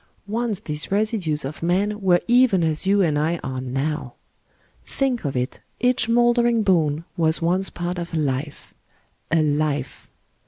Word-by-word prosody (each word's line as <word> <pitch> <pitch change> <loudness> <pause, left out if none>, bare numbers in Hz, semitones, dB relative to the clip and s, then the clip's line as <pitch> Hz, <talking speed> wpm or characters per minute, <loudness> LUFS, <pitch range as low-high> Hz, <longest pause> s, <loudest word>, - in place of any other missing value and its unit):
Once 220 0 -2
these 150 +2 -5
residues 200 - 0
of 140 +3 -7
men 200 +5 0
were 180 -2 +3
even 240 -7 +4
as 160 +3 -1
you 200 0 +4
and 150 -4 +1
I 160 +3 0
are 130 -1 -4
now. 135 +1 -3 0.7
Think 260 -4 -1
of 135 - -2
it, 125 +2 -3 0.2
each 250 -1 +2
mouldering 240 -1 +3
bone 165 -5 +1
was 160 -1 +2
once 180 +3 +1
part 175 +1 -4
of 170 0 -6
a 165 - -2
life 145 0 -3 0.6
ŌĆö 165 - +3
a - - +4
life 145 -2 -1
170 Hz, 160 wpm, -22 LUFS, 150-210 Hz, 0.7 s, even